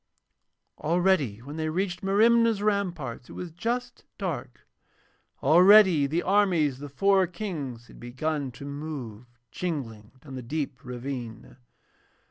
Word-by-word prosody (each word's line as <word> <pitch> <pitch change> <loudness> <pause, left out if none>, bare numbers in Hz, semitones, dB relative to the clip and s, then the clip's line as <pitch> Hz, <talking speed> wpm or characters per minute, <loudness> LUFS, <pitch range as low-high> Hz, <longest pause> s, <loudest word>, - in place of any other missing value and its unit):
Already 155 - +1
when 145 +4 -8
they 155 0 -1
reached 180 +2 -2
Merimna's 220 +2 +3
ramparts 175 - -2
it - - -10
was 180 -2 -6
just 235 +9 -3
dark, - - -5 0.8
already 180 -3 +7
the 165 +5 -1
armies 180 -9 +2
of - - -16
the 145 0 -7
four 195 +5 +3
Kings 155 - -6
had - - -16
begun 140 +4 -3
to 130 +3 -10
move, 140 -6 -7 0.2
jingling, 120 -11 -5
down 140 -2 -11
the 130 - -5
deep 140 +1 -4
ravine. 125 -2 -7
155 Hz, 125 wpm, -27 LUFS, 130-190 Hz, 0.8 s, already